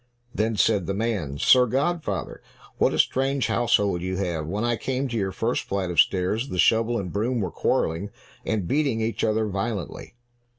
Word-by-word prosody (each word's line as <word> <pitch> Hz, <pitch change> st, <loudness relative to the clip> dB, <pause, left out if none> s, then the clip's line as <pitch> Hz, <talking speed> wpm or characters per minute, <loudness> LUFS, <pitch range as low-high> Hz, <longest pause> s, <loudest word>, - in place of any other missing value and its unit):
Then 110 Hz, +1 st, 0 dB
said 105 Hz, -3 st, +2 dB
the 100 Hz, -, -1 dB
man, 100 Hz, -11 st, -2 dB
"Sir 125 Hz, -, +5 dB
godfather, 135 Hz, -, -2 dB, 0.4 s
what -, -, +3 dB
a -, -, -2 dB
strange 135 Hz, 0 st, +1 dB
household 105 Hz, -6 st, +1 dB
you 95 Hz, +1 st, -3 dB
have! 85 Hz, -5 st, -2 dB
When 100 Hz, +6 st, -2 dB
I 120 Hz, 0 st, +1 dB
came 130 Hz, +3 st, -2 dB
to 120 Hz, -, -5 dB
your 95 Hz, -4 st, -1 dB
first 115 Hz, +5 st, -1 dB
flight 95 Hz, -2 st, -2 dB
of 85 Hz, -, 0 dB
stairs, 100 Hz, +10 st, +2 dB
the 90 Hz, -, -4 dB
shovel 115 Hz, +6 st, +3 dB
and 90 Hz, -5 st, -4 dB
broom 115 Hz, +4 st, 0 dB
were 95 Hz, -5 st, -2 dB
quarreling, 85 Hz, +6 st, -1 dB, 0.3 s
and 105 Hz, -6 st, -2 dB
beating 140 Hz, -, +1 dB
each 110 Hz, +1 st, -2 dB
other 110 Hz, 0 st, +1 dB
violently." 100 Hz, +1 st, -4 dB
110 Hz, 180 wpm, -24 LUFS, 95-120 Hz, 0.4 s, Sir